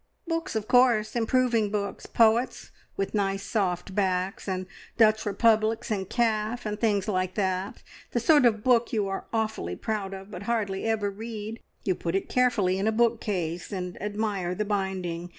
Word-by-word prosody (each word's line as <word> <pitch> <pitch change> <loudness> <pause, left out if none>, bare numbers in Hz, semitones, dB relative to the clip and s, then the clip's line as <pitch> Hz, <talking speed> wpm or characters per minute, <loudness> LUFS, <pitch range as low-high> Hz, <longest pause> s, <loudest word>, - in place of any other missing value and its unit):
"Books, 330 -3 -2
of 215 -1 -2
course. 245 -4 +4
Improving 235 -2 +2
books. 200 -1 -3
Poets, 230 +2 +2 0.3
with 195 - -2
nice 195 -1 0
soft 190 -3 -1
backs, 190 -1 -1
and 185 -1 -2 0.3
Dutch 215 -2 +4
Republics 220 +1 +2
in 195 -3 -1
calf, 225 0 0
and 210 0 -3
things 205 -4 +1
like 185 -2 -1
that. 190 -1 -2 0.3
The 240 - 0
sort 285 +1 +5
of 215 -2 0
book 240 -1 +3
you 210 -5 0
are 195 0 -4
awfully 220 - -2
proud 200 - -3
of, 195 +1 -10
but 180 - -7
hardly 205 -4 -1
ever 215 -2 0
read. 220 +1 -6 0.2
You 190 - +1
put 170 0 -3
it 195 - -1
carefully 210 -7 +2
in 200 - 0
a - - +3
bookcase, 210 -7 0
and 180 -2 -5
admire 205 -3 -2
the 210 - -1
binding. 190 -4 -2
210 Hz, 170 wpm, -27 LUFS, 190-225 Hz, 0.3 s, sort